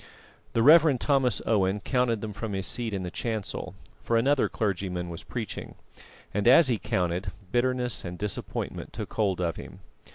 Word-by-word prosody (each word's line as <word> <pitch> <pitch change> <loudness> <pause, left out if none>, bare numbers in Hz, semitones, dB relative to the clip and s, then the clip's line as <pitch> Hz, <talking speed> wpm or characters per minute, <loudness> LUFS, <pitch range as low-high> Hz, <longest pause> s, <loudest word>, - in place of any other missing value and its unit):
The 115 - +2
Rev. 155 -1 +7
Thomas 130 -5 +1
Owen 100 -2 +2
counted 120 -2 0
them 110 -1 -5
from 110 0 -5
his 95 -1 -2
seat 120 -2 -1
in 95 -2 -3
the 90 - -5
chancel, 110 -2 -4 0.3
for 115 - +1
another 135 +4 +2
clergyman 90 -4 -2
was 85 - -7
preaching; 115 -5 -6 0.6
and, 105 +2 0
as 135 +3 +7
he 115 -4 +1
counted, 95 -3 -1 0.2
bitterness 125 -1 0
and 90 -1 -6
disappointment 105 0 -4
took - - -6
hold 100 -4 0
of 85 -2 -1
him. - - -10
110 Hz, 165 wpm, -27 LUFS, 95-125 Hz, 0.6 s, Rev